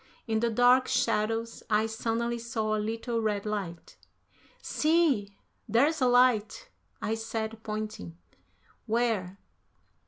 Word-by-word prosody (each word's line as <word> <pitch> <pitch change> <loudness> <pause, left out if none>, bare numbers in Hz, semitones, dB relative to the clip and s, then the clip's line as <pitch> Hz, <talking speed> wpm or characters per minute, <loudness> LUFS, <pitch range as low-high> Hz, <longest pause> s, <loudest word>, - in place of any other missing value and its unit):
In 220 -2 0
the 235 +1 +1
dark 245 +3 +4
shadows 225 +2 0
I 215 0 +3
suddenly 230 +1 -2
saw 220 -2 -2
a 215 - -1
little 230 +2 -2
red 210 -2 -1
light. 195 -6 -5 0.6
"See, 295 -12 +1 0.3
there's 280 +8 +3
a 255 - +4
light," 245 - +2 0.3
I 220 - 0
said, 225 0 -4
pointing. 215 - -5 0.7
"Where?" 220 -5 0
225 Hz, 115 wpm, -28 LUFS, 215-235 Hz, 0.7 s, dark